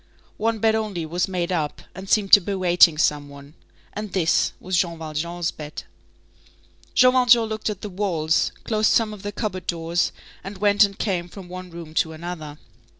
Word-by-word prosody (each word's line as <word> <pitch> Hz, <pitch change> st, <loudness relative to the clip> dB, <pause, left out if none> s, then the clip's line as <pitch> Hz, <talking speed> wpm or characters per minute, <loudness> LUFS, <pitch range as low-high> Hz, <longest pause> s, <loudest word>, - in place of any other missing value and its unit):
One 225 Hz, +1 st, 0 dB
bed 220 Hz, +1 st, +2 dB
only 210 Hz, -7 st, -2 dB
was 175 Hz, +3 st, -1 dB
made 180 Hz, -2 st, -2 dB
up, 155 Hz, -5 st, -2 dB
and 190 Hz, 0 st, -9 dB
seemed 205 Hz, -3 st, +2 dB
to -, -, +12 dB
be 200 Hz, +3 st, -3 dB
waiting 175 Hz, -3 st, +5 dB
some 145 Hz, -2 st, +1 dB
one, 140 Hz, +1 st, -13 dB, 0.4 s
and 210 Hz, -1 st, -6 dB
this 170 Hz, -4 st, +2 dB
was 185 Hz, 0 st, -3 dB
Jean 170 Hz, -1 st, 0 dB
Valjean's 165 Hz, +2 st, -3 dB
bed. 150 Hz, 0 st, -8 dB, 1.1 s
Jean 255 Hz, 0 st, +6 dB
Valjean 245 Hz, -2 st, +5 dB
looked 220 Hz, 0 st, -3 dB
at 205 Hz, -2 st, -5 dB
the -, -, -5 dB
walls, 175 Hz, -5 st, 0 dB
closed 215 Hz, -1 st, +1 dB
some 220 Hz, -2 st, +2 dB
of 205 Hz, -, -10 dB
the 205 Hz, 0 st, -5 dB
cupboard 185 Hz, -5 st, -4 dB
doors, 170 Hz, +1 st, 0 dB, 0.3 s
and 195 Hz, +1 st, -8 dB
went 205 Hz, +1 st, +4 dB
and 200 Hz, 0 st, -1 dB
came 180 Hz, -4 st, -2 dB
from 185 Hz, -1 st, -11 dB
one 185 Hz, 0 st, -8 dB
room 165 Hz, -2 st, -10 dB
to 160 Hz, 0 st, 0 dB
another. 160 Hz, -2 st, -7 dB
180 Hz, 185 wpm, -23 LUFS, 165-210 Hz, 1.1 s, to